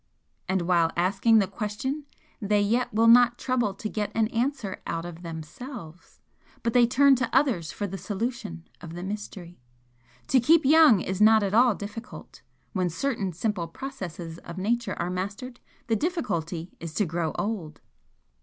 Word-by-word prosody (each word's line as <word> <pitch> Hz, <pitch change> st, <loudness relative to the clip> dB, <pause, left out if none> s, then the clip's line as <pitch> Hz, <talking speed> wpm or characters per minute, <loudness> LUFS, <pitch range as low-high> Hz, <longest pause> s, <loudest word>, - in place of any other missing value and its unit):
And 190 Hz, -1 st, +1 dB
while 170 Hz, -2 st, +3 dB
asking 195 Hz, +6 st, +3 dB
the 205 Hz, -, +4 dB
question 230 Hz, +9 st, -4 dB, 0.4 s
they 205 Hz, 0 st, +2 dB
yet 230 Hz, +5 st, +1 dB
will 225 Hz, +2 st, +2 dB
not 240 Hz, +1 st, +6 dB
trouble 240 Hz, -6 st, -1 dB
to 215 Hz, -, -5 dB
get 210 Hz, -1 st, -3 dB
an 220 Hz, -1 st, +2 dB
answer 235 Hz, -4 st, -2 dB
OUT 165 Hz, 0 st, -3 dB
OF 175 Hz, -1 st, -8 dB
THEMSELVES, 170 Hz, -, -9 dB, 0.4 s
but 230 Hz, -1 st, 0 dB
they 245 Hz, -1 st, +5 dB
turn 275 Hz, +2 st, +5 dB
to 255 Hz, -1 st, -1 dB
others 205 Hz, -, +1 dB
for 205 Hz, -, -4 dB
the 195 Hz, -1 st, -6 dB
solution 195 Hz, -, -4 dB
of 165 Hz, -1 st, -9 dB
the 175 Hz, -, -6 dB
mystery. 190 Hz, -3 st, -7 dB, 0.7 s
To 265 Hz, -, +5 dB
keep 315 Hz, +5 st, +4 dB
young 300 Hz, -, +6 dB
is 190 Hz, +2 st, -3 dB
not 220 Hz, 0 st, +6 dB
at 195 Hz, 0 st, -1 dB
all 240 Hz, 0 st, +5 dB
difficult; 215 Hz, +5 st, -9 dB, 0.3 s
when 185 Hz, -3 st, 0 dB
certain 200 Hz, -, -2 dB
simple 180 Hz, 0 st, -2 dB
processes 175 Hz, -, -7 dB
of 170 Hz, -, -10 dB
Nature 220 Hz, +2 st, -1 dB
are 175 Hz, +1 st, -1 dB
mastered 200 Hz, +7 st, -5 dB, 0.3 s
the 225 Hz, -, +1 dB
difficulty 180 Hz, -, -2 dB
is 165 Hz, -1 st, -7 dB
to 210 Hz, -, +2 dB
grow 165 Hz, -1 st, -2 dB
old!" 190 Hz, -8 st, -4 dB
205 Hz, 165 wpm, -26 LUFS, 175-240 Hz, 0.7 s, not